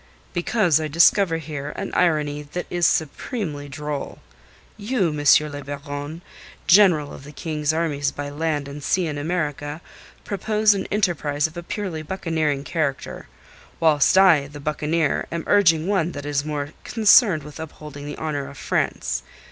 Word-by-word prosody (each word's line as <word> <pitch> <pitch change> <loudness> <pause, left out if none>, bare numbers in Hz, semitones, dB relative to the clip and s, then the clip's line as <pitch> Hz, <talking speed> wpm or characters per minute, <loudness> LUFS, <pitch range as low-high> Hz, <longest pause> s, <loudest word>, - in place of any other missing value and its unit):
"Because 175 -4 +2
I 155 - -2
discover 170 +3 +4
here 150 -2 -6
an - - -5
irony 150 -4 +1
that 150 +5 -6
is 175 -1 +3
supremely 155 - -2
droll. 150 0 -5 0.6
You, 210 -3 0
M. 150 0 +4
le 145 0 -7
Baron, 145 +3 -6 0.4
General 175 -7 +5
of - - -10
the 145 - -11
King's 150 -1 -2
Armies 150 -3 0
by 145 0 -6
Land 150 -1 -2
and 140 +1 -8
Sea 185 +3 +1
in 150 -2 -3
America, 150 -2 -3 0.5
propose 210 +1 +2
an 195 -1 -3
enterprise 170 -8 0
of 160 +1 -4
a 175 - -5
purely 175 -3 -4
buccaneering 155 -4 -1
character; 150 -4 -3 0.5
whilst 155 0 +4
I, 170 -7 +6
the 145 +1 -10
buccaneer, 155 +2 0
am 165 -1 -3
urging 165 -6 +4
one 180 -4 +1
that 145 0 -7
is 145 -1 0
more 145 -1 -3
concerned 210 - +5
with 150 +1 -11
upholding 150 -2 -8
the 145 - -6
honour 145 -3 -3
of 140 - -12
France. - - -1
155 Hz, 155 wpm, -23 LUFS, 145-175 Hz, 0.6 s, I